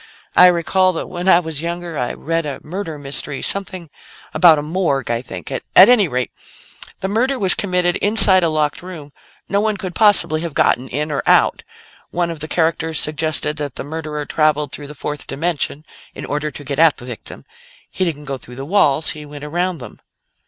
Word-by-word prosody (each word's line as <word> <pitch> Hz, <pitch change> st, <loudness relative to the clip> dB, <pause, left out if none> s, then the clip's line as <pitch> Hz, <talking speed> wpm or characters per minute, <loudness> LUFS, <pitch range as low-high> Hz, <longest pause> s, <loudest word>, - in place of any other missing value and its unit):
I 180 Hz, -, +8 dB
recall 185 Hz, +2 st, +2 dB
that 165 Hz, -, -4 dB
when 180 Hz, +1 st, -3 dB
I 170 Hz, -, +6 dB
was 160 Hz, -4 st, -4 dB
younger, 170 Hz, 0 st, -5 dB
I 125 Hz, -4 st, -2 dB
read 165 Hz, +1 st, -2 dB
a 145 Hz, -3 st, -6 dB
murder 165 Hz, -2 st, -6 dB
mystery 140 Hz, 0 st, -3 dB
something 185 Hz, -5 st, -3 dB, 0.4 s
about 165 Hz, -4 st, +6 dB
a 145 Hz, -, -3 dB
morgue, 150 Hz, -7 st, -1 dB
I 115 Hz, 0 st, -1 dB
think. 95 Hz, -9 st, -9 dB
At -, -, -3 dB
any 205 Hz, +1 st, +7 dB
rate, 125 Hz, -4 st, -3 dB, 0.7 s
the 190 Hz, -, -2 dB
murder 250 Hz, +7 st, 0 dB
was 195 Hz, -5 st, +4 dB
committed 180 Hz, -3 st, 0 dB
inside 200 Hz, -3 st, +7 dB
a 170 Hz, -, +1 dB
locked 150 Hz, -2 st, -1 dB
room; 165 Hz, -6 st, -10 dB, 0.3 s
no 200 Hz, +1 st, 0 dB
one 215 Hz, -1 st, -1 dB
could 185 Hz, -2 st, -5 dB
possibly 200 Hz, -7 st, +3 dB
have 165 Hz, -3 st, -6 dB
gotten 130 Hz, +2 st, +1 dB
in 150 Hz, +4 st, -3 dB
or 140 Hz, -, -1 dB
out. -, -, +3 dB, 0.5 s
One 175 Hz, -1 st, -2 dB
of 165 Hz, -, -8 dB
the 155 Hz, -, -4 dB
characters 160 Hz, -1 st, 0 dB
suggested 155 Hz, 0 st, -1 dB
that 145 Hz, -4 st, -5 dB
the -, -, -3 dB
murderer 150 Hz, 0 st, -5 dB
traveled 150 Hz, -1 st, 0 dB
through 145 Hz, -1 st, -8 dB
the 150 Hz, -, -10 dB
fourth 150 Hz, +1 st, -6 dB
dimension 155 Hz, -1 st, -3 dB, 0.3 s
in -, -, -7 dB
order 150 Hz, +1 st, -3 dB
to 145 Hz, -, -9 dB
get 140 Hz, +1 st, -4 dB
at 165 Hz, -2 st, +5 dB
the 125 Hz, -, -11 dB
victim. 120 Hz, -3 st, -10 dB, 0.5 s
He -, -, -2 dB
didn't 150 Hz, -4 st, -3 dB
go 135 Hz, -1 st, -5 dB
through 125 Hz, +1 st, -13 dB
the 135 Hz, +2 st, -7 dB
walls; 160 Hz, -4 st, +2 dB
he 150 Hz, -, -8 dB
went 145 Hz, 0 st, -11 dB
around 175 Hz, +4 st, -2 dB
them." 120 Hz, -6 st, -12 dB
160 Hz, 200 wpm, -18 LUFS, 145-180 Hz, 0.7 s, I